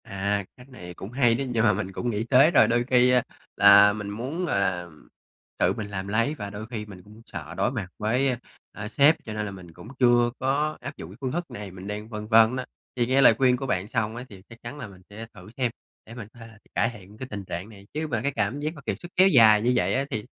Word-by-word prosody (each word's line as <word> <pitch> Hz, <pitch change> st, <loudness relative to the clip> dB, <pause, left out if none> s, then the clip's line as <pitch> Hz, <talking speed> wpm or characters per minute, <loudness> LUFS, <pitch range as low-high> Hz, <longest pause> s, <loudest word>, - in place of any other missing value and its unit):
À, 100 Hz, +1 st, -2 dB
cách 125 Hz, +2 st, -16 dB
này 90 Hz, -9 st, -10 dB
cũng 95 Hz, +4 st, -9 dB
hay 120 Hz, -3 st, +3 dB
đó, 140 Hz, -, -2 dB
nhưng 115 Hz, -3 st, 0 dB
mà 110 Hz, -3 st, +4 dB
mình 95 Hz, -1 st, -4 dB
cũng 120 Hz, +6 st, -3 dB
nghĩ 110 Hz, -1 st, -2 dB
tới 135 Hz, +6 st, +5 dB
rồi. -, -, +5 dB
Đôi 120 Hz, +1 st, +1 dB
khi 125 Hz, 0 st, +3 dB, 0.4 s
là 100 Hz, 0 st, +7 dB
mình 105 Hz, -1 st, -6 dB
muốn, 130 Hz, -, -4 dB
gọi 100 Hz, -, 0 dB
là, 90 Hz, -3 st, -1 dB, 0.7 s
tự -, -, +2 dB
mình 105 Hz, -2 st, -6 dB
làm 95 Hz, -1 st, -5 dB
lấy, 115 Hz, +8 st, 0 dB
và 100 Hz, -7 st, -6 dB
đôi 105 Hz, +2 st, -7 dB
khi 110 Hz, -3 st, -6 dB
mình 95 Hz, -4 st, -12 dB
cũng 105 Hz, +3 st, -16 dB
sợ 80 Hz, -1 st, -8 dB
đối 120 Hz, -, +1 dB
mặt 110 Hz, -8 st, -4 dB
với, 125 Hz, +6 st, +1 dB
a, 125 Hz, -, -1 dB, 0.3 s
à, 105 Hz, 0 st, -7 dB
sếp, 145 Hz, +7 st, +4 dB
cho 110 Hz, -, -6 dB
nên 105 Hz, 0 st, -3 dB
là 100 Hz, -, -5 dB
mình 90 Hz, -3 st, -12 dB
cũng 90 Hz, +5 st, -13 dB
chưa 120 Hz, -1 st, +4 dB
có 150 Hz, +4 st, 0 dB
áp 140 Hz, +4 st, -8 dB
dụng 80 Hz, -, -9 dB
cái 100 Hz, -, -13 dB
phương 130 Hz, -2 st, -2 dB
thức 175 Hz, +3 st, -4 dB
này, 100 Hz, -2 st, -8 dB
mình 95 Hz, +1 st, -10 dB
đang 105 Hz, +1 st, -6 dB
phân 105 Hz, -2 st, -6 dB
vân 115 Hz, +2 st, +5 dB
á. 130 Hz, -, -4 dB, 0.3 s
Thì 120 Hz, -2 st, +1 dB
nghe 130 Hz, +3 st, +3 dB
lời 125 Hz, -, +7 dB
khuyên 125 Hz, -1 st, +3 dB
của 135 Hz, -, -5 dB
bạn 95 Hz, -3 st, -1 dB
xong 110 Hz, -2 st, -2 dB
á, 120 Hz, +1 st, -7 dB
thì 95 Hz, -3 st, -13 dB
chắc 115 Hz, +1 st, -14 dB
chắn 120 Hz, +5 st, -7 dB
là 130 Hz, -6 st, -7 dB
mình 95 Hz, -2 st, -15 dB
sẽ 110 Hz, +2 st, -8 dB
thử 90 Hz, -1 st, -13 dB
xem 125 Hz, -3 st, 0 dB, 0.3 s
để 115 Hz, -, -12 dB
mình 115 Hz, -5 st, -8 dB
có 120 Hz, -, -17 dB
thể 115 Hz, -, -10 dB
là 110 Hz, -1 st, -17 dB, 0.2 s
cải 115 Hz, -, +2 dB
thiện 105 Hz, 0 st, -14 dB
cái 130 Hz, -, -7 dB
tình 100 Hz, -2 st, -6 dB
trạng 90 Hz, +4 st, -6 dB
này. 100 Hz, -2 st, -15 dB
Chứ 155 Hz, +1 st, -3 dB
mà 115 Hz, -7 st, -2 dB
cái 140 Hz, +3 st, -1 dB
cảm 110 Hz, +2 st, -2 dB
giác 155 Hz, +2 st, -3 dB
mà 150 Hz, -, -11 dB
kiệt -, -, -3 dB
sức 175 Hz, -, -11 dB
kéo 190 Hz, +1 st, +6 dB
dài 110 Hz, -, +6 dB
như 125 Hz, +3 st, +2 dB
vậy 90 Hz, 0 st, +1 dB
á, 135 Hz, +1 st, 0 dB
thì 105 Hz, -1 st, -3 dB
110 Hz, 280 wpm, -25 LUFS, 100-125 Hz, 0.7 s, là